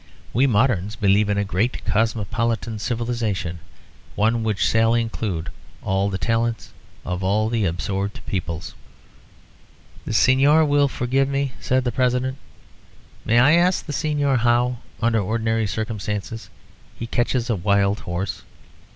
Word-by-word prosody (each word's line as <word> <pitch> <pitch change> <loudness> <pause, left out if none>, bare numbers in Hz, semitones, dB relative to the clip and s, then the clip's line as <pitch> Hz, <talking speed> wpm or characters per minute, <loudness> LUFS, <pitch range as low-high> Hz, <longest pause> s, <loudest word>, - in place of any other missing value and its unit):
We 130 +4 +3
moderns 105 -4 +1
believe 105 0 +2
in 100 - +1
a 100 - +2
great 105 +6 -1
cosmopolitan 110 +1 -1
civilisation, 115 -7 -2 0.6
one 115 +2 +2
which 110 -2 -1
shall 115 +2 +3
include 110 -7 -2 0.3
all 95 +1 0
the 95 - -2
talents 115 +3 -1 0.3
of 90 +1 -3
all 105 +3 +1
the 115 -3 0
absorbed 95 +3 -2
peoples 85 -3 -4 0.7
" - - -27
"The - - -4
Señor 140 +7 +4
will 145 0 +3
forgive 130 +1 0
me," 140 -1 -1
said 130 0 +1
the 125 - -1
President. 130 +2 0 0.9
"May 115 - +3
I 130 +5 +6
ask 175 +2 +3
the 150 - -5
Señor 145 -4 +1
how, 120 +1 +2 0.3
under 115 -1 +3
ordinary 110 +1 0
circumstances, 110 0 -4 0.5
he 115 - -4
catches 120 +1 0
a 115 - +1
wild 100 +1 +1
horse?" 85 +3 -4
115 Hz, 135 wpm, -22 LUFS, 100-125 Hz, 0.9 s, I